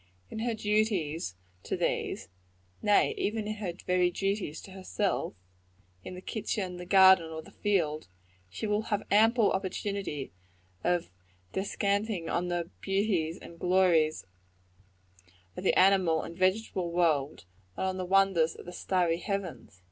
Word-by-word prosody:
In 220 - -5
her 230 0 -1
duties 205 - 0 0.3
to - - -3
these - - -1 0.5
nay, 205 -1 +4
even 215 0 -1
in 215 0 -3
her 200 -4 -3
very 180 -1 +3
duties 195 -3 -2
to 195 - -12
herself 190 +1 -2 0.7
in 185 - -7
the 180 - -8
kitchen, 195 -3 -3
the 180 0 -8
garden 190 -3 +7
or 160 0 -6
the - - -15
field, 160 -7 0 0.4
she 95 - -5
will 210 0 +1
have 205 -1 0
ample 225 +2 +5
opportunity 190 -5 -3 0.5
of 175 - 0 0.4
descanting 200 -2 -1
on 180 - 0
the 175 -1 -2
beauties 195 -5 0
and 170 - -12
glories 175 - +3 1.3
of - - -6
the - - +3
animal 185 -4 +4
and 170 - -8
vegetable 185 -1 0
world, 155 - +1 0.3
and - - -1
on 190 0 -1
the 185 - -2
wonders 185 -3 +3
of - - -11
the 175 - -8
starry 175 -2 +1
heavens. 185 - -5
185 Hz, 140 wpm, -29 LUFS, 170-200 Hz, 1.3 s, garden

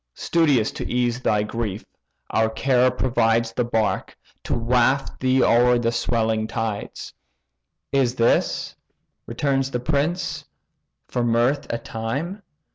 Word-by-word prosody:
Studious 145 -10 +2
to - - -6
ease 125 0 0
thy 105 -4 +1
grief, 105 -2 -4 0.5
our 110 0 +2
care 125 +2 +2
provides 115 -2 +1
The 125 - 0
bark, 115 -2 -1 0.3
to - - -1
waft 125 +3 +1
thee 130 0 +3
o'er 125 +1 +4
the 115 -1 0
swelling 110 -2 0
tides." 110 -3 -4 0.8
"Is 130 -3 +1
this 115 -2 +1 0.5
(returns 135 +3 0
the 125 - -2
prince) 150 +7 -1 0.6
for 125 - -1
mirth 120 +5 +1
a 115 - -1
time? 140 - -4
120 Hz, 120 wpm, -23 LUFS, 115-130 Hz, 0.8 s, o'er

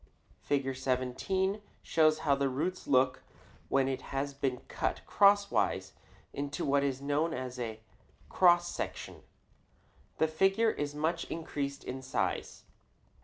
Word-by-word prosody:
Fig. 135 -2 -1
17 135 +11 -1 0.2
shows 155 -1 +3
how 140 -2 +4
a 140 0 0
root 165 +8 -3
looks 130 -1 +3 0.5
when 135 -1 +3
it 130 -1 -2
has 140 +1 -3
been 135 -2 -2
cut - - -3
crosswise 200 0 +3 0.4
into 140 0 -3
what 140 0 +2
is 135 -1 -2
known 150 +4 0
as 125 -1 -5
a 110 -2 -4 0.5
cross 175 -1 +4
section. - - -5 1.0
The 160 - +3
figure 195 +8 +3
is 145 -4 -4
much 165 +3 -1
increased 140 -4 -4
in 130 +1 -5
size. 130 - -2
140 Hz, 125 wpm, -31 LUFS, 130-165 Hz, 1.0 s, how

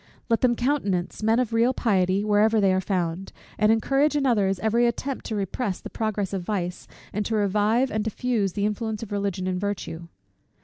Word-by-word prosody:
Let 230 - +2
them 245 -2 +3
countenance 225 -10 -1
men 220 +1 +3
of 245 -3 -1
real 235 +3 +3
piety 190 -3 +1
wherever 215 +1 +3
they 195 -2 +3
are 190 - +1
found; 180 -1 -2 0.3
and 215 0 +4
encourage 275 +7 +2
in 285 -2 +1
others 200 -6 +2
every 230 +4 +2
attempt 265 +3 -3
to 220 - -3
repress 200 +1 -2
the - - -9
progress 210 -3 -2
of 195 - -1
vice, 180 -2 -3 0.3
and 210 - -1
to 225 - -1
revive 210 +5 +2
and 215 0 -1
diffuse 220 -3 -1
the 205 - -1
influence 215 +1 -2
of 215 - -9
Religion 200 -2 -2
and 185 0 -2
virtue. 190 -5 -4
210 Hz, 190 wpm, -25 LUFS, 195-230 Hz, 0.3 s, and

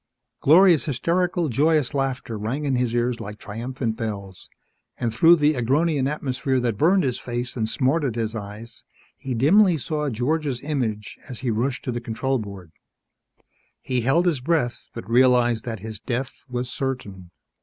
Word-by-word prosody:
Gloria's 170 +1 +6
hysterical, 170 +5 0
joyous 150 +2 +2
laughter 135 -4 -2
rang 115 +8 -3
in 135 -2 +1
his 125 -1 0
ears 120 0 0
like 105 +1 -7
triumphant 115 +2 -4
bells, 100 -5 -6 0.5
and 115 -2 -1
through 165 +9 +6
the 150 -1 +3
Agronian 140 +3 +1
atmosphere 135 -2 -1
that 120 -3 -1
burned 180 - +3
his 125 -3 -1
face 120 0 -4
and 110 -3 -1
smarted 130 +2 0
his 115 -1 -2
eyes 110 +2 -8 0.3
he 130 -2 -5
dimly 175 - +5
saw 150 +1 -2
George's 135 +2 -1
image 120 -8 -3
as 125 - -8
he 125 -3 0
rushed 125 +4 -1
to 125 - -2
the 120 0 -4
control 130 +3 -1
board. 100 -5 -9 1.1
He 125 -1 -1
held 135 +9 +2
his 160 -8 +1
breath 145 -4 0
but 95 - -7
realized 120 -1 +3
that 115 -5 -5
his 110 -1 -7
death 125 +2 -3 0.2
was 125 0 -3
certain. 105 -10 -5
125 Hz, 160 wpm, -23 LUFS, 115-145 Hz, 1.1 s, Gloria's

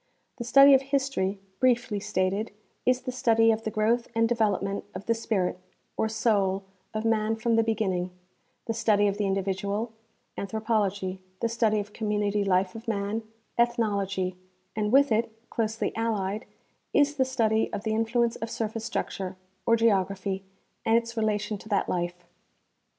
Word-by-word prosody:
The 235 - -3
study 275 +3 +8
of 265 - +6
history, 265 -8 -1 0.2
briefly 240 -4 +2
stated, 200 +1 -1 0.4
is 255 0 +3
the 255 - -4
study 225 -3 +4
of 220 0 -1
the - - 0
growth 225 +2 +1
and 230 0 +4
development 205 -4 0
of - - -6
the 230 - +3
spirit, 210 -6 -1 0.4
or 220 - 0
soul, 200 -4 +1 0.3
of 215 +1 -3
man 220 -1 +2
from 230 +1 +1
the 225 - +5
begin 220 -3 0
ning; 180 0 -2 0.5
the 225 - -1
study 210 -2 +3
of 200 +1 -1
the 205 - +1
individual, 200 +3 -1 0.5
anthropology; 200 -3 -1 0.2
the 230 - +1
study 225 -2 +2
of 205 0 -6
community 210 -1 0
life 185 -1 +2
of 225 +1 -10
man, 205 0 -1 0.4
ethnology; 200 -6 +1 0.4
and 210 -1 0
with 275 0 +5
it, 225 +1 +2 0.2
closely 225 -1 -1
allied, 215 -1 -1 0.5
is 290 0 +3
the 265 - +4
study 225 -4 +1
of 200 - -4
the 220 - 0
influence 230 +1 +1
of 225 - -4
surface 225 -1 -3
structure, 190 -4 -3 0.3
or 230 - +6
geography, 195 -3 +1 0.4
and 225 +1 +4
its 235 0 -2
relation 210 -2 0
to 220 - -12
that 200 - +1
life. 175 0 -2
220 Hz, 160 wpm, -27 LUFS, 200-230 Hz, 0.5 s, study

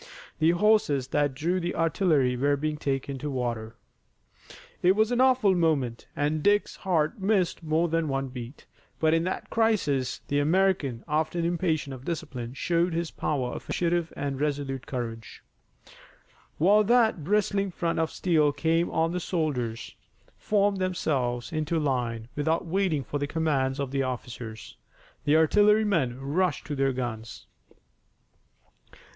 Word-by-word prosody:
The 160 +1 +4
horses 175 -8 +2
that 145 -2 +1
drew 170 +6 0
the 175 0 -3
artillery 160 -6 +2
were 140 +3 +1
being 155 +1 -2
taken 135 -1 -3
to 150 +3 -4
water. 120 -4 -3 1.1
It 185 +2 +4
was 220 +2 +2
an 245 +1 +2
awful 255 -6 +4
moment 150 -9 0
and 150 +2 0
Dick's 205 +4 +2
heart 180 +3 0
missed 190 -4 +1
more 160 +1 +1
than 165 -1 0
one 135 -1 -2
beat, 125 +1 -9 0.3
but 160 0 +3
in 165 +1 +2
that 185 - -4
crisis 185 - +1
the 145 - +1
American, 155 -6 +1
often 155 +3 0
impatient 165 -5 -1
of 130 -1 -9
discipline, 140 -7 -5
showed 170 +3 0
his 170 -1 -2
power 130 -5 -2
of - - -7
initiative 170 -1 0
and 140 -1 -2
his 135 - -6
resolute 140 -3 -2
courage. 115 -3 -6 1.1
While 205 +6 +5
that 225 -7 +3
bristling 200 +2 +1
front 170 -2 -2
of 160 -1 +1
steel 155 -5 +2
came 165 +4 +1
on 165 +1 +1
the 180 - -2
soldiers 140 -11 -2 0.4
formed 205 -1 +1
themselves 140 -10 -1
into 155 +1 -1
line 120 -6 -1
without 160 +4 0
waiting 170 -4 0
for 145 +4 -4
the 145 - -2
commands 145 -4 0
of 140 -2 -2
the 135 0 0
officers. 120 -3 -6 0.5
The 145 - +4
artillerymen 190 - +3
rushed 155 +5 -1
to 150 - -4
their 135 0 +1
guns. 120 -3 -5
155 Hz, 145 wpm, -27 LUFS, 135-175 Hz, 1.1 s, While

